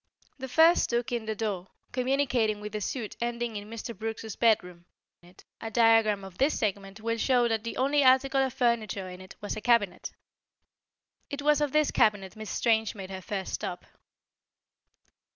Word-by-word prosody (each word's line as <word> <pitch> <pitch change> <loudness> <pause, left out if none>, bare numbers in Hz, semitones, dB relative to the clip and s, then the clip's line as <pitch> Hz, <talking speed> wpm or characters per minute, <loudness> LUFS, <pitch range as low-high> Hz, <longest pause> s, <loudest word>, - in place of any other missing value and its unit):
The 265 - -5
first 325 +6 +5
took 240 +1 -1
in 235 -2 -2
the 220 0 -3
door, 200 -4 -3 0.2
communicating 250 -4 +1
with 210 0 -7
the 210 0 -4
suite 220 +1 -4
ending 235 -1 -2
in 205 0 -6
Mr. 230 +1 -6
Brooks's 220 -1 -5
bedroom. 180 -7 +1 0.8
A 225 - -4
diagram 225 -3 +4
of 190 -2 -11
this 275 +4 +2
segment 200 -1 -3
will 230 +1 -2
show 245 0 +3
that 225 -1 -1
the 230 - -5
only 280 +2 +2
article 265 +1 +4
of 265 -1 0
furniture 230 -6 0
in 180 0 -9
it 185 - -12
was 205 - -4
a 215 - -6
cabinet. 210 -7 +1 1.2
It 285 -1 -5
was 300 0 +3
at 295 -2 +1
this 305 0 +2
cabinet 205 -4 +1
Miss 215 -2 -8
Strange 220 0 +1
made 195 -2 -8
her 190 0 -6
first 190 0 -4
stop. 175 0 -4
225 Hz, 170 wpm, -28 LUFS, 205-250 Hz, 1.2 s, first